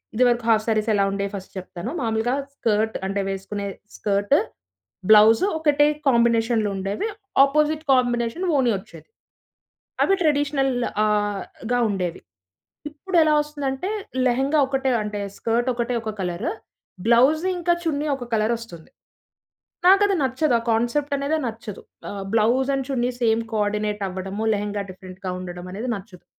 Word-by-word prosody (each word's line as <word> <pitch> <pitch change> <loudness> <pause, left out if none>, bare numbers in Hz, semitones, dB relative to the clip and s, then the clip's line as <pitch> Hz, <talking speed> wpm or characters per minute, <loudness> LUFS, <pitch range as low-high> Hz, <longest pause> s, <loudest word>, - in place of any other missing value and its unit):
ఇదివరకు 240 -1 +2
హాఫ్ 220 -1 +3
శారీస్ 215 -1 +1
ఎలా 200 - +3
ఉండేవి 200 0 -2
ఫస్ట్ 190 -1 -9
చెప్తాను. 185 +3 -7
మామూలుగా 225 +2 0 0.2
స్కర్ట్ 220 -4 0
అంటే, 200 +1 -2
వేసుకునే 200 +1 -5 0.3
స్కర్టు 200 0 +2 0.7
,బ్లౌజు 220 - +7
ఒకటే 295 -2 +4 0.2
కాంబినేషన్లుండేవి. 225 - +1 0.4
అపోజిట్ 305 +2 +1
కాంబినేషన్ 245 +5 0
ఓని 250 -3 +3
వచ్చేది. 165 -4 -14 0.9
అవి 390 - +3
ట్రెడిషనల్‌ 285 -3 +1 0.3
ఆహ్, 205 -1 0 0.3
గా 245 - +3
ఉండేవి. 180 -3 -2 0.7
ఇప్పుడు 345 +5 -3
ఎలా 310 -1 +3
వస్తుందంటే, 290 +2 -4 0.4
లెహెంగా 270 +5 +2
ఒకటే, 270 -1 0
అంటే 210 0 -4 0.2
స్కర్ట్ 235 +2 0
ఒకటే 240 +1 -2
ఒక 220 -1 -4
కలరు. 180 - -2 0.5
బ్లౌజు 260 +8 +4
ఇంకా 345 0 +2
చున్నీ 300 -3 -1
ఒక 260 - -7
కలరొస్తుంది. 220 -6 -2 1.0
నాకది 395 +2 +6
నచ్చదు. 265 +1 +1
ఆ - - -10
కాన్సెప్ట్ 240 +6 0
అనేదే 280 +3 -1
నచ్చదు. 220 -3 -7 0.3
ఆ! - - -5 0.2
Blouse 235 +4 +2
and 270 -1 -2
chunnis 250 -2 -1
same 225 0 +2
coordinate 210 0 -1
అవ్వడము 190 +3 -4
లెహెంగా 205 0 -2
డిఫరెంట్‌గా 185 0 -8
ఉండడం 180 -1 -7
అనేది 220 +6 -4
నచ్చదు. 190 -3 -12
230 Hz, 130 wpm, -23 LUFS, 205-270 Hz, 1.0 s, బ్లౌజు